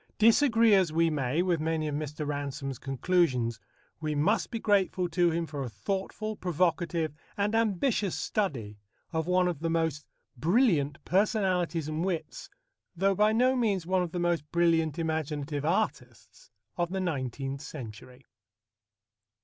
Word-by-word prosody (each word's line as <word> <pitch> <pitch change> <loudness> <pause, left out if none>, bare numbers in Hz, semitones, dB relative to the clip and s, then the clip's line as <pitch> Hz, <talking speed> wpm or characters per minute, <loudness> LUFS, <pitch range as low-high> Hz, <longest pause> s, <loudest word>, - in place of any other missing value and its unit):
Disagree 230 0 +5
as 190 -5 +4
we 165 +1 +2
may 145 +3 0
with 175 -3 +1
many 160 0 -1
of 150 - -3
Mr. 150 +1 -4
Ransome's 140 -2 -4
conclusions, 135 - +1 0.4
we 155 -2 -2
must 165 +7 +1
be 230 - -3
grateful 195 -4 +1
to 175 +1 +3
him 165 0 -1
for 150 -3 -6
a 130 - -3
thoughtful, 195 - -3
provocative, 170 -3 0 0.2
and 205 +1 0
ambitious 220 -2 +1
study 120 - -2 0.3
of 160 0 -1
one 180 0 +3
of 175 -5 -2
the 165 +1 -1
most 160 -3 -1 0.3
brilliant 155 - +2
personalities 180 -5 +1
and 155 +2 -2
wits, 180 -4 -4 0.5
though 195 +3 +2
by 210 +3 +3
no 250 +4 +3
means 205 -8 0
one 185 +1 +1
of 175 -2 -3
the 180 - -4
most 175 -2 +1
brilliant 165 -3 +2
imaginative 155 -3 -2
artists, 190 +7 -3 0.3
of 175 -1 0
the 190 +1 -2
nineteenth 135 -5 -3
century. 125 -2 -9
165 Hz, 145 wpm, -29 LUFS, 145-190 Hz, 0.5 s, Disagree